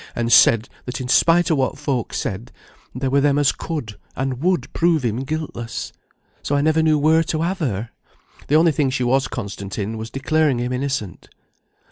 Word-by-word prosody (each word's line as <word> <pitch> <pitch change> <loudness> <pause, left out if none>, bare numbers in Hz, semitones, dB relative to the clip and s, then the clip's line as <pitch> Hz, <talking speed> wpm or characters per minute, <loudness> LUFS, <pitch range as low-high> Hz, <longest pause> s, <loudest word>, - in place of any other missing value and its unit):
and 120 0 0
said, 115 0 +6 0.2
that 125 0 -5
in 130 - -5
spite 170 +6 +4
of 155 - +2
what 130 - 0
folk 140 -5 -2
said, 110 +5 -4 0.4
there 130 0 -2
were 140 +1 +3
them 145 0 +2
as 145 -4 +3
could, 130 -7 -6 0.2
and 130 -1 -3
would 180 +1 0
prove 165 -4 +2
him 115 -1 -1
guiltless. 135 -4 -5 0.5
So 145 - -1
I 140 - +2
never 155 +2 +2
knew 155 -1 +3
where 160 +2 +4
to 160 -1 -2
have 185 +3 -2
her. 115 - -3 0.6
The 145 - +2
only 165 +1 +5
thing 145 -2 0
she 130 -1 -1
was 130 +2 +2
constant 100 -4 -6
in, 110 +2 -3
was 110 +1 -6
declaring 145 +1 +1
him 125 +1 -2
innocent." 125 - -4
135 Hz, 190 wpm, -21 LUFS, 120-155 Hz, 0.6 s, said